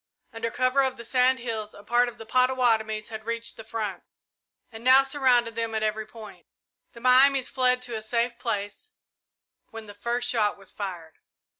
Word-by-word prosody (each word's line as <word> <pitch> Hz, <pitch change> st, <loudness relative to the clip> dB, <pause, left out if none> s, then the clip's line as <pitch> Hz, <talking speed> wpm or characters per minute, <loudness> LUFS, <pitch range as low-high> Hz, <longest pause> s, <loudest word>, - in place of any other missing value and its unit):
Under 225 Hz, 0 st, -3 dB
cover 255 Hz, +3 st, +2 dB
of 265 Hz, -1 st, -1 dB
the 235 Hz, -, -8 dB
sand 255 Hz, +2 st, +3 dB
hills 220 Hz, -3 st, -5 dB
a 205 Hz, -, -13 dB
part 240 Hz, +3 st, +2 dB
of 240 Hz, -, -14 dB
the 225 Hz, -, -10 dB
Pottawattomies 230 Hz, -3 st, +1 dB
had 220 Hz, -1 st, -7 dB
reached 230 Hz, 0 st, -2 dB
the 225 Hz, -, -10 dB
front, 220 Hz, -3 st, -4 dB, 0.7 s
and 225 Hz, 0 st, -10 dB
now 260 Hz, +2 st, +7 dB
surrounded 255 Hz, -4 st, +2 dB
them 225 Hz, 0 st, -3 dB
at 220 Hz, -, -1 dB
every 215 Hz, 0 st, -2 dB
point. 210 Hz, -6 st, -13 dB, 0.5 s
The 235 Hz, -, -12 dB
Miamis 260 Hz, +2 st, +5 dB
fled 250 Hz, -1 st, +2 dB
to 245 Hz, -2 st, -4 dB
a 220 Hz, -, -4 dB
safe 235 Hz, +2 st, -1 dB
place 210 Hz, -, -4 dB, 0.8 s
when 225 Hz, -1 st, -9 dB
the 205 Hz, -, -11 dB
first 235 Hz, +4 st, -2 dB
shot 220 Hz, -6 st, +1 dB
was 195 Hz, -1 st, -9 dB
fired. 175 Hz, -6 st, -7 dB
230 Hz, 180 wpm, -26 LUFS, 215-250 Hz, 0.8 s, now